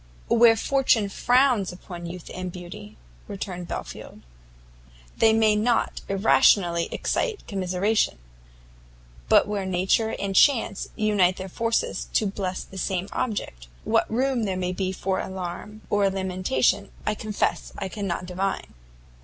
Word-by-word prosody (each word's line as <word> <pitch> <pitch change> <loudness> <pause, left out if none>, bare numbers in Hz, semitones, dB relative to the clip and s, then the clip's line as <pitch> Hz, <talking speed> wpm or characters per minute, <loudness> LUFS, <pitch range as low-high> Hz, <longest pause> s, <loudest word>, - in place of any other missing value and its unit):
"Where 230 -1 +6
fortune 240 -5 +2
frowns 245 -3 +2
upon 175 -1 -9
youth 175 0 -8
and 185 -1 -5
beauty," 175 - -10 0.3
returned 185 -3 -6
Belfield, - - -7 0.9
"they 225 - +5
may 220 -1 +4
not 230 +3 +1
irrationally 190 -3 +3
excite 455 -4 -2
commiseration; 195 - 0 1.1
but - - +5
where 205 -1 -2
nature 190 +4 +1
and 195 -1 -3
chance 230 -5 +3
unite 205 -4 +2
their 190 - -5
forces 230 +4 -1
to 215 - +2
bless 190 -2 -3
the 190 - -9
same 185 +1 -2
object, 200 - -3 0.2
what - - +1
room 250 0 +1
there 190 -2 -2
may 180 -1 -1
be 185 0 -2
for 190 0 -2
alarm 190 +3 -6
or 205 -1 +3
lamentation 185 -8 0 0.2
I 215 - +1
confess 210 -1 -2
I 195 - -3
cannot 190 -3 -4
divine." 185 +2 -3
195 Hz, 130 wpm, -25 LUFS, 180-215 Hz, 1.1 s, Where